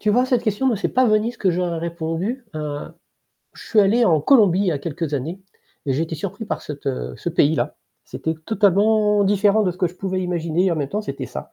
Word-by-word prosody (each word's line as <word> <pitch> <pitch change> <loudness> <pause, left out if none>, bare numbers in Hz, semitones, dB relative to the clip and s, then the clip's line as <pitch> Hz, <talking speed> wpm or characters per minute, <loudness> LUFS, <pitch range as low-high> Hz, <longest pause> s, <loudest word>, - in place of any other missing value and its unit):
Tu 215 - -1
vois, 245 +4 +4
à - - 0
cette 250 -2 +1
question, 220 +4 0
non, 235 -5 +2
c'est - - -1
pas 255 0 +2
Venise 215 +2 +1
ce - - -22
que 190 - +2
j'aurais 175 -1 -1
répondu, 170 +9 -3
heu. 150 -1 -5 0.6
Je - - -12
suis 215 - +4
allé 225 +5 +4
en 160 -7 +3
Colombie 200 - +4
il 200 - +1
y - - +3
a 145 - -1
quelques 150 0 -4
années 160 +8 -4 0.5
et 135 - +1
j'ai 155 - 0
été 165 0 -4
surpris 155 - -5
par - - -3
cette - - -9
heu 60 0 -3
ce - - -4
pays-là. 150 +2 +1 0.3
C'était 160 0 -4
totalement 210 0 +3
différent 205 +2 +3
de 185 - +1
ce 175 - -10
que 180 - +2
je 175 - -8
pouvais 190 0 -3
imaginer 175 0 0
et - - +2
en - - -1
même 140 -2 -3
temps, 210 - -1
c'était 215 - -5
ça. - - -8
185 Hz, 250 wpm, -21 LUFS, 165-215 Hz, 0.6 s, vois